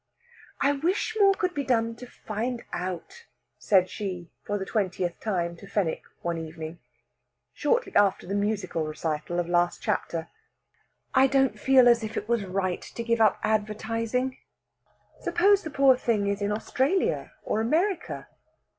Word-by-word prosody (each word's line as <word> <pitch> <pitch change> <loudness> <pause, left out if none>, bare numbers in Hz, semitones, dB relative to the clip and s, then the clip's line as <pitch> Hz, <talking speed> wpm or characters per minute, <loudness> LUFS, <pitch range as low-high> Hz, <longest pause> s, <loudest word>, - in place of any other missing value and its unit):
"I 275 - +3
wish 350 +9 0
more 395 -1 +6
could 365 -3 -1
be 285 - -2
done 230 -3 +1
to 250 - -9
find 235 +2 -4
out," 185 - -5 0.3
said 190 -4 +4
she 185 -5 -5
for 205 - -2
the 190 - -4
twentieth 185 -5 -1
time 175 -5 -1
to 200 - -12
Fenwick 195 -6 -1 0.2
one 170 -1 -1
evening, 160 +1 -7 0.7
shortly 475 +12 0
after 200 -2 +3
the 190 - -4
musical 200 -5 -1
recital 155 +2 -3
of 175 - -1
last 175 0 +2
chapter. 165 -1 -1 0.9
"I 265 - +6
don't 270 -1 +2
feel 265 -2 +6
as 235 -1 +5
if 220 +1 -4
it - - -3
was 235 -2 +1
right 185 -1 -1
to 235 - -7
give 230 0 +1
up 215 -3 +4
advertising. 225 +4 -1 0.8
Suppose 400 +2 +3
the 320 - -6
poor 275 -2 +5
thing 230 -5 0
is 200 0 -1
in 205 0 0
Australia 265 - 0
or 215 - 0
America." 335 - 0
215 Hz, 155 wpm, -27 LUFS, 185-265 Hz, 0.9 s, more